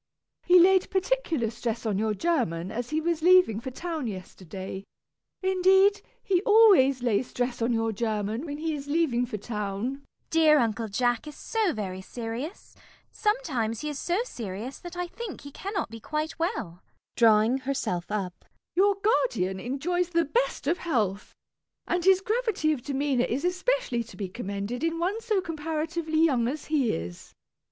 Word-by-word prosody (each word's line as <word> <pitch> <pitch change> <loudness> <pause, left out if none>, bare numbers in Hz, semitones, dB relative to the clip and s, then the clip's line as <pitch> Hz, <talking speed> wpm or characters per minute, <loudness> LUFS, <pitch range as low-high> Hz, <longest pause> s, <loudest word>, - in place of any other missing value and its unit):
He 360 - +6
laid 375 +1 +5
particular 370 - 0
stress 230 0 -4
on 205 -3 0
your 215 0 0
German, 200 - 0
as 240 +1 -4
he 310 +1 0
was 335 0 -1
leaving 360 - +5
for 250 - -5
town 315 0 -4
yesterday. 190 -1 -7 0.6
Indeed, 380 +2 +4 0.2
he 365 -2 +2
always 390 - +6
lays 240 0 +1
stress 245 -1 -3
on 230 +2 +2
your 225 -1 +1
German 220 +4 -2
when 290 0 -4
he 320 +1 -2
is 285 -1 -6
leaving 285 -6 +1
for 225 -3 -4
town. 210 +2 -3
CECILY. 280 - -25 0.3
Dear 315 -2 +5
Uncle 230 -2 0
Jack 245 +6 0
is 300 - -8
so 440 -5 0
very 190 -5 -4
serious! 235 - -6 0.4
Sometimes 265 - -1
he 300 - -3
is 290 -2 -5
so 360 +6 0
serious 230 - -6
that 350 0 -9
I 355 - -1
think 415 +2 -7
he 285 - -10
cannot 390 - -4
be 225 - -8
quite 305 +7 -3
well. 335 - -1
MISS 175 - -20
PRISM. - - -44
[Drawing 225 +1 +5
herself 260 -10 -2
up.] 190 -4 -3 0.3
Your 400 +2 +4
guardian 385 - +1
enjoys 335 - -1
the 335 -1 +2
best 485 - -1
of 335 +5 +1
health, 215 - -1 0.5
and 355 0 -1
his 380 0 +5
gravity 425 -8 +1
of 270 - -5
demeanour 275 -2 0
is 270 +8 -2
especially 365 - 0
to 230 - -13
be 195 -3 -4
commended 200 - -4
in 330 0 0
one 380 +7 -1
so 430 -4 +1
comparatively 320 0 -1
young 250 -7 +2
as 295 +5 -4
he 290 -6 +1
is. 85 +1 -6
280 Hz, 170 wpm, -27 LUFS, 225-355 Hz, 0.6 s, He